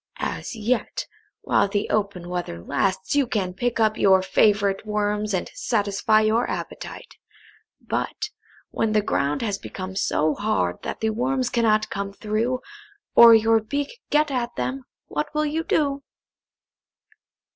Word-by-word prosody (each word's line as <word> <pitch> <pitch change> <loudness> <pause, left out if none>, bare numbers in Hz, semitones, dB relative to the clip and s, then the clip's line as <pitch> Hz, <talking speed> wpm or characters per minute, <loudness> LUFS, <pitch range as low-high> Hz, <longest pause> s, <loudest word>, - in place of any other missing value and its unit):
"As - - -4
yet, 225 +2 -1 0.4
while - - +2
the 200 +1 -1
open 200 -4 -1
weather 175 - -4
lasts, 140 - -1
you 280 -3 +3
can 190 -6 -1
pick 240 +5 -1
up 215 -1 +2
your 190 -1 +5
favourite 200 0 +2
worms, 210 0 -1
and 185 -3 -2
satisfy 215 - +1
your 220 +3 +2
appetite. - - -7 0.6
But, - - -3 0.4
when 220 -1 0
the 210 -1 +3
ground 145 -1 0
has 200 -3 -2
become 190 0 -7
so 155 -5 +1
hard 175 - -1
that - - -5
the 220 0 +1
worms 255 +2 -1
cannot 220 -2 +2
come 200 0 -4
through, 225 +5 -1 0.5
or 235 -1 +9
your 225 0 +4
beak 285 - -4
get 300 0 +2
at 245 -2 -2
them, 125 +1 -3 0.2
what 150 0 -3
will 305 0 +2
you 310 +2 -1
do?" 285 -4 0
215 Hz, 145 wpm, -24 LUFS, 195-235 Hz, 0.6 s, or